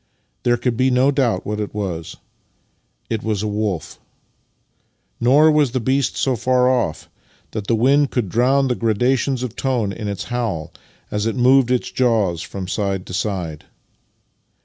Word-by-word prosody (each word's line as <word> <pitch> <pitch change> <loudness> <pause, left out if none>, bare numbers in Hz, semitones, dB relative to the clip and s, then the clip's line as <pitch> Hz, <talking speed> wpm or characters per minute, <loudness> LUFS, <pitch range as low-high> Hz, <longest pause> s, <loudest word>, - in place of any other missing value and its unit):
There 120 0 +2
could 120 0 -1
be 130 +3 +2
no 130 +2 +3
doubt 125 -9 0
what 105 0 -3
it 105 0 -4
was. 90 -6 -4 0.9
It 110 -2 -2
was 110 -2 -2
a - - -1
wolf. 105 -5 -3 1.2
Nor 145 +6 +5
was 150 -5 +2
the 130 - +1
beast 130 +2 0
so 130 -2 +1
far 125 +2 +2
off 120 -12 0 0.4
that 105 -2 -5
the 115 - +2
wind 135 +5 +3
could 120 -5 -1
drown 130 +7 +2
the 125 - +1
gradations 125 +3 0
of 120 -2 -5
tone 120 -7 -1
in 105 -1 -5
its 100 -3 -3
howl 115 -11 -3 0.4
as 105 +1 -1
it 115 - -1
moved 130 0 +4
its 125 -1 0
jaws 110 -9 +1
from 95 -1 -6
side 100 -2 -2
to - - -9
side. 90 -5 -3
115 Hz, 165 wpm, -20 LUFS, 100-130 Hz, 1.2 s, Nor